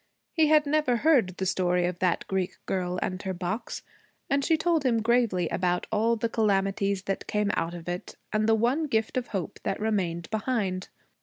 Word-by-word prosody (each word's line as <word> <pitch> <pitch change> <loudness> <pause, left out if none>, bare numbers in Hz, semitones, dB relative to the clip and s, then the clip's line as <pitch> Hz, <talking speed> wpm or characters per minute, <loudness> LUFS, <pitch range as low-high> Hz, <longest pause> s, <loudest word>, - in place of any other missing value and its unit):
He 320 -2 +4
had 305 0 +5
never 290 -4 +2
heard 240 - +3
the 190 - -2
story 180 -1 +1
of 175 0 -3
that 180 -2 +1
Greek 190 -2 -2
girl 180 -1 -1
and 185 +1 -3
her 190 -2 -3
box, 185 +6 -4 0.5
and 280 0 +2
she 325 +2 +3
told 330 -1 +1
him 230 -4 +2
gravely 225 -7 +2
about 180 -1 0
all 225 +2 +2
the 230 +1 -1
calamities 195 -3 +1
that 195 0 -3
came 210 -1 +1
out 170 +1 -1
of 170 -1 -9
it, 175 +1 -5 0.2
and 215 +1 +2
the 225 - +5
one 250 +8 +1
gift 225 -4 0
of 255 -1 -1
hope 190 -6 -4
that - - -2
remained 180 -6 -1
behind. 210 -5 -1
210 Hz, 190 wpm, -27 LUFS, 185-240 Hz, 0.5 s, had